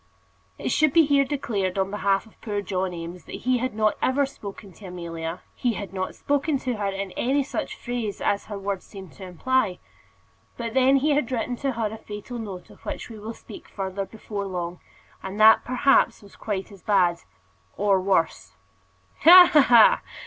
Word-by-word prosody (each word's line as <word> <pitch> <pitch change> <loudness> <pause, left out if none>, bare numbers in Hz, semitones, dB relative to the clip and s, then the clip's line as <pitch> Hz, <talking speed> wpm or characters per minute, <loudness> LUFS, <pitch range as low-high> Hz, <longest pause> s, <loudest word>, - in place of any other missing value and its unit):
It - - -3
should 310 -3 +3
be 330 -2 +6
here 280 -1 +3
declared 210 -10 -2
on 195 0 0
behalf 200 0 0
of 220 - -22
poor 205 -3 -3
John 185 -1 -2
Eames 170 0 -8
that - - -8
he 255 -1 +2
had 255 -2 -3
not 215 -1 +1
ever 275 +2 +2
spoken 200 -7 -10
to 200 - -12
Amelia 170 -1 -6
he 245 -2 -1
had 200 -2 -7
not 185 -1 -4
spoken 285 +1 0
to 255 -3 -3
her 205 -1 -2
in 195 -1 -4
any 275 +7 0
such 290 +2 -4
phrase 240 -4 -4
as 200 - 0
her 205 - -6
words 195 -1 -4
seemed 190 -4 -11
to 195 - -12
imply. 190 +2 0 0.8
But 230 -2 -4
then 265 +1 +4
he 285 +3 +2
had 285 -4 0
written 245 0 -2
to 275 0 -2
her 220 -2 -2
a - - -7
fatal 215 +4 -8
note 195 -5 -8
of - - -18
which - - -6
we 220 - -9
will 220 +2 -7
speak - - -12
further 195 0 -4
before 205 -2 -6
long, 175 -2 -5 0.4
and 190 +2 -6
that 220 +1 +7
perhaps 255 -2 +2
was 200 - -16
quite 205 -1 -4
as 195 -2 -14
bad, 180 -4 +2 0.6
or 200 -2 +2
worse. 185 -4 0 0.6
"Ha, 355 +1 +9
ha, 300 - +8
ha!" 240 -4 +6
210 Hz, 190 wpm, -24 LUFS, 190-255 Hz, 0.8 s, Ha